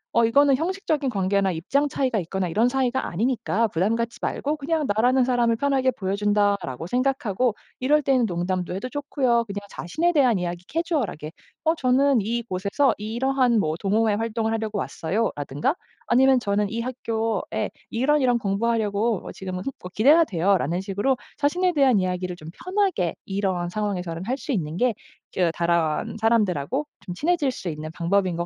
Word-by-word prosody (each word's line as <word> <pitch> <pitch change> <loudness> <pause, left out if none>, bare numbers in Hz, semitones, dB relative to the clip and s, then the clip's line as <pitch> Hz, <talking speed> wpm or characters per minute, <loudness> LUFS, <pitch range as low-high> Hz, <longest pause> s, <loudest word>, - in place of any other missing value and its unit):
어 235 - +5
이거는 275 +4 +4
형식적인 320 -4 -1
관계나 195 -2 +1
입장 275 - 0
차이가 255 -5 0
있거나 185 +1 -2
이런 220 +8 +2
사이가 265 0 0
아니니까 230 +2 0
부담 190 +6 +1
갖지 230 0 -3
말고 295 +2 -2
그냥 305 +1 -1
'나라는 245 +5 +3
사람을 240 -2 +2
편하게 270 0 +1
보여 195 -5 -2
준다.'라고 200 -8 0
생각하고 250 -1 0 0.2
이럴 295 +3 +3
때는 255 -3 +3
농담도 180 0 -2
해도 225 +7 -4
좋고요. 265 -4 0
그냥 205 -1 -5
자신에 320 - 0
대한 255 - +4
이야기 175 0 -4
캐주얼하게 290 - -2 0.3
"어 320 0 +3
저는 265 -4 +3
이곳에서 230 +3 0
이러한 240 +2 +1
뭐 155 -4 0
동호회 215 +2 +2
활동을 225 +1 -1
하려고 220 -2 -2
왔어요."라든가 165 - -1 0.3
아니면 265 +1 +4
"저는 205 -2 0
이 230 +2 -3
학교에 225 -3 -2 0.2
이런 285 +5 +2
이런 245 -2 +3
공부하려고 215 0 0
어 - - -5
지금은 185 -1 -6
흠 275 - -3
뭐 180 - -7
기대가 300 +9 +6
돼요."라는 180 - +1
식으로 205 +7 0 0.2
자신에 355 +5 +1
대한 265 - +4
이야기를 180 -1 -2
좀 160 -2 -11
편하게 370 - 0
이런 190 -3 -1
상황에서는 180 -4 -3
할 255 +5 -1
수 285 - -5
있는 165 - -2
게 245 0 +2 0.4
저 180 -2 +2
다른사람들하고 175 - 0 0.2
좀 180 - -6
친해질 310 - +1
수 225 - -6
있는 155 -1 -4
방법인 180 +2 0
것 170 +1 -2
225 Hz, 390 characters per minute, -24 LUFS, 185-265 Hz, 0.4 s, 기대가